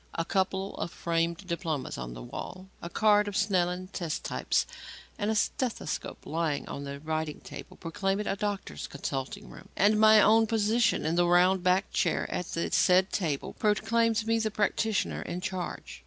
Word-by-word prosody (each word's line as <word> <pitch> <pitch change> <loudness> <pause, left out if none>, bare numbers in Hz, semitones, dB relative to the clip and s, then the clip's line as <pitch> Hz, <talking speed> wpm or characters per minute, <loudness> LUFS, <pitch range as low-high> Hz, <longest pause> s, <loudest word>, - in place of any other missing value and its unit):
A 165 - -1
couple 190 +1 -1
of - - -3
framed 170 +2 -1
diplomas 170 -5 -3
on - - -6
the - - -8
wall, 185 - -7
a 170 - -6
card 210 +1 +3
of 205 - -4
Snellen's 185 -2 0
test 170 -5 -3
types - - 0 0.5
and 205 0 0
a 220 - +1
stethoscope 225 - -2
lying 160 -2 -1
on 140 - -6
the 140 0 -6
writing 155 0 -3
table, - - -10
proclaim 195 +3 -2
it 210 - -2
a - - 0
doctor's 200 - -4
consulting 135 +10 -5
room; - - -13
and 210 +2 +4
my 215 0 +8
own 220 +2 +5
position 225 -2 +2
in 165 +2 0
the 175 0 +4
round 180 +2 +4
backed 185 +2 +1
chair 170 -4 +1
at 180 - -3
the 170 - -2
said 185 +1 +4
table, 155 -8 -2
proclaims 225 +1 +1
me 225 0 +2
the 220 -1 0
practitioner 215 0 0
in 175 - -4
charge. 185 -1 -5
185 Hz, 175 wpm, -29 LUFS, 165-210 Hz, 0.5 s, my